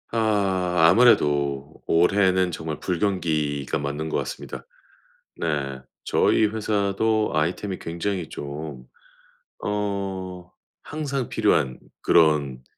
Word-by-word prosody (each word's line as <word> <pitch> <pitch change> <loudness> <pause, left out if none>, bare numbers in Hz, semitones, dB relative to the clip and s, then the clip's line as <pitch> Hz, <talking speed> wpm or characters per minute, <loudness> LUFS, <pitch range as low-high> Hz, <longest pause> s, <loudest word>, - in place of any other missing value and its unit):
아. 100 -5 +1 0.2
아무래도 75 - +3
올해는 95 +1 +3
정말 80 -2 -5
불경기가 80 -7 -1
맞는 70 +2 -3
것 - - 0
같습니다. - - -6 0.7
네. 70 -5 -2 0.3
저희 110 - +3
회사도 105 0 0
아이템이 90 +5 -1
굉장히 85 +1 -3
좀 70 -2 -7 0.8
어 95 -3 -3 0.3
항상 140 -4 -3
필요한 65 -1 +1 0.2
그런 75 -6 +3
90 Hz, 200 characters per minute, -24 LUFS, 75-100 Hz, 0.8 s, 아무래도